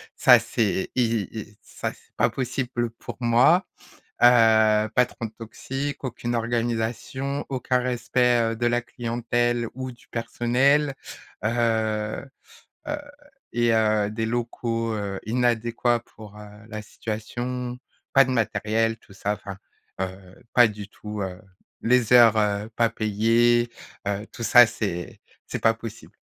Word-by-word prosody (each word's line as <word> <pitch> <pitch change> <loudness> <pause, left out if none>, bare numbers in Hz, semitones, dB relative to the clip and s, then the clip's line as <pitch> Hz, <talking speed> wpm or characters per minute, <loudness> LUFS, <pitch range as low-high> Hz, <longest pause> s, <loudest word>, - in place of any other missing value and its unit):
ça - - +7
c'est 100 -4 -1
y 110 -3 -2
ça - - -5
c'est - - -25
pas - - +3
possible 125 -2 -2
pour 115 - -9
moi, 125 - +4 0.6
heu, 110 -3 +5
patron 125 -2 +1
toxique. 135 +5 -5
Aucune 120 -1 -3
organisation, 120 +4 -2
aucun 130 -1 0
respect, 125 0 +1
heu, 115 - -5
de 120 - 0
la 120 0 +1
clientèle 120 -1 -1
ou 130 0 -5
du 120 - -17
personnel. 130 +5 +1 0.5
Heu, 110 -2 0 0.6
heu 295 0 -1 0.6
et 120 -1 +3
heu, 110 -2 +2
des 110 +1 -2
locaux, 115 -1 -2
heu, 100 -2 -4
inadéquats 120 0 +1
pour, 105 -3 -14
heu, 105 - -10 0.2
la 110 -1 -5
situation. 120 +4 -5 0.4
Pas 135 0 +7
de 130 - -3
matériel 115 -1 0
tout 100 - -19
ça, 105 +1 -2
enfin, 100 -1 -9 0.4
heu, 95 +2 -7
pas 120 -1 +7
du 105 -1 -8
tout, 105 -1 -7
heu 90 -1 -5 0.4
les 125 0 +3
heures, 115 -3 +8
heu, 105 0 0
pas 115 -1 +3
payées, 115 +2 +2 0.4
heu, 100 +1 -2
tout 130 - -10
ça 120 +3 +8
c'est 100 -6 -4 0.2
c'est - - -4
pas 115 0 +3
possible. 115 -1 -10
115 Hz, 130 wpm, -24 LUFS, 110-120 Hz, 0.6 s, heures